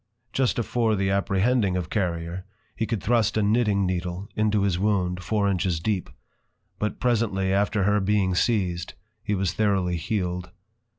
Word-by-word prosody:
_ -, -, -42 dB
Just 130 Hz, -2 st, +1 dB
afore 115 Hz, -1 st, +1 dB
the 95 Hz, -1 st, 0 dB
Apprehending 100 Hz, +1 st, +1 dB
of 90 Hz, -3 st, -4 dB
Carrier, 85 Hz, -3 st, -2 dB, 0.3 s
he 110 Hz, -, -2 dB
could 115 Hz, -5 st, -2 dB
thrust 110 Hz, -2 st, +2 dB
a 110 Hz, -, +2 dB
knitting 105 Hz, -2 st, +2 dB
Needle 90 Hz, +1 st, -3 dB
into 105 Hz, -1 st, +2 dB
his 95 Hz, -3 st, +1 dB
wound, 95 Hz, -3 st, 0 dB
four 100 Hz, +3 st, +1 dB
inches 90 Hz, -3 st, 0 dB
deep; 100 Hz, +1 st, -1 dB, 0.7 s
but 105 Hz, -, -2 dB
presently 105 Hz, -6 st, +1 dB
after 100 Hz, +1 st, +1 dB
her 105 Hz, +2 st, +3 dB
being 95 Hz, -1 st, +1 dB
siezed, 90 Hz, -5 st, 0 dB, 0.3 s
he 105 Hz, -1 st, -1 dB
was 95 Hz, -3 st, 0 dB
throughly 95 Hz, -3 st, +1 dB
healed. 90 Hz, 0 st, -2 dB
100 Hz, 160 wpm, -25 LUFS, 90-110 Hz, 0.7 s, her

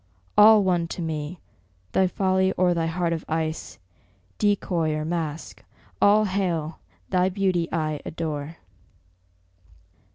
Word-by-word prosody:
All 210 Hz, 0 st, +7 dB
one 175 Hz, -3 st, +1 dB
to -, -, -4 dB
me! 160 Hz, +1 st, -4 dB, 0.5 s
thy 190 Hz, -, +3 dB
folly 190 Hz, 0 st, +1 dB
or 180 Hz, -1 st, +2 dB
thy 165 Hz, -1 st, -1 dB
heart 170 Hz, 0 st, -1 dB
of 160 Hz, -, -4 dB
ice, 160 Hz, 0 st, -3 dB, 0.6 s
Decoy 180 Hz, -6 st, +1 dB
or 155 Hz, 0 st, -3 dB
mask, 160 Hz, -2 st, -4 dB, 0.4 s
all 210 Hz, +1 st, +5 dB
hail! 175 Hz, -5 st, -2 dB, 0.3 s
thy 185 Hz, 0 st, +3 dB
beauty 185 Hz, -3 st, 0 dB
I 155 Hz, -3 st, -2 dB
adore! 155 Hz, -1 st, -5 dB
170 Hz, 120 wpm, -24 LUFS, 160-190 Hz, 0.6 s, All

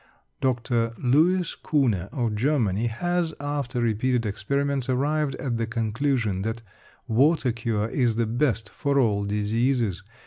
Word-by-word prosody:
Dr. 120 Hz, -2 st, 0 dB
Louis 165 Hz, +8 st, +2 dB
Kuhne 115 Hz, -, +1 dB
of 120 Hz, -5 st, -1 dB
Germany 115 Hz, -3 st, +1 dB
has, 175 Hz, +7 st, -1 dB
after 145 Hz, -3 st, -3 dB
repeated 120 Hz, +1 st, +1 dB
experiments, 140 Hz, +5 st, -1 dB
arrived 140 Hz, +2 st, 0 dB
at 125 Hz, -4 st, -3 dB
the 115 Hz, -1 st, -1 dB
conclusion 115 Hz, -2 st, 0 dB
that 115 Hz, +2 st, -3 dB, 0.4 s
water 130 Hz, +3 st, +3 dB
cure 110 Hz, -2 st, -1 dB
is 120 Hz, -2 st, +1 dB
the 115 Hz, 0 st, +1 dB
best 115 Hz, -2 st, 0 dB
for 140 Hz, +5 st, -1 dB
all 105 Hz, -6 st, +2 dB
diseases. 105 Hz, 0 st, 0 dB
120 Hz, 130 wpm, -25 LUFS, 110-140 Hz, 0.4 s, water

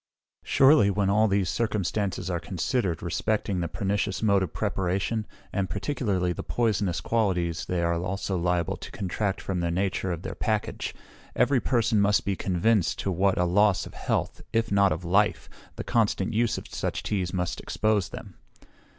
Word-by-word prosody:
Surely, 135 Hz, -6 st, +5 dB
when 100 Hz, 0 st, +1 dB
all 110 Hz, +2 st, +4 dB
these 100 Hz, -2 st, +1 dB
circumstances 105 Hz, -2 st, -1 dB
are 90 Hz, -2 st, -1 dB
considered 90 Hz, -, -2 dB
respecting 95 Hz, +3 st, -1 dB
the 85 Hz, -, -1 dB
pernicious 100 Hz, +4 st, -2 dB
mode 100 Hz, -2 st, +4 dB
of 90 Hz, -4 st, -2 dB
preparation, 95 Hz, +4 st, -1 dB, 0.3 s
and 95 Hz, -2 st, -1 dB
particularly 95 Hz, -, -1 dB
the -, -, -5 dB
poisonous 105 Hz, -6 st, 0 dB
qualities 90 Hz, -7 st, 0 dB
they 90 Hz, -1 st, 0 dB
are 85 Hz, 0 st, +2 dB
also 95 Hz, +3 st, -2 dB
liable 90 Hz, -1 st, 0 dB
to -, -, -9 dB
contract 100 Hz, +1 st, -2 dB
from 95 Hz, -2 st, -3 dB
the 85 Hz, 0 st, 0 dB
nature 95 Hz, +1 st, -1 dB
of 85 Hz, 0 st, -4 dB
their -, -, -4 dB
package, 110 Hz, -2 st, -2 dB, 0.4 s
every 125 Hz, +2 st, +3 dB
person 115 Hz, -4 st, +2 dB
must 100 Hz, 0 st, +3 dB
be 100 Hz, -, 0 dB
convinced 95 Hz, +1 st, +1 dB
to 95 Hz, -, -2 dB
what 95 Hz, +2 st, +2 dB
a 90 Hz, -, +2 dB
loss 100 Hz, +1 st, +3 dB
of -, -, -11 dB
health, -, -, -2 dB
if 115 Hz, -1 st, 0 dB
not 100 Hz, -1 st, +4 dB
of 85 Hz, +3 st, -3 dB
life, 100 Hz, +4 st, +2 dB, 0.3 s
the -, -, -5 dB
constant 110 Hz, -2 st, +1 dB
use 115 Hz, +1 st, +1 dB
of -, -, -7 dB
such -, -, -3 dB
teas 95 Hz, -4 st, -1 dB
must 90 Hz, -2 st, -2 dB
expose 110 Hz, -4 st, 0 dB
them. -, -, -9 dB
100 Hz, 170 wpm, -27 LUFS, 90-105 Hz, 0.4 s, Surely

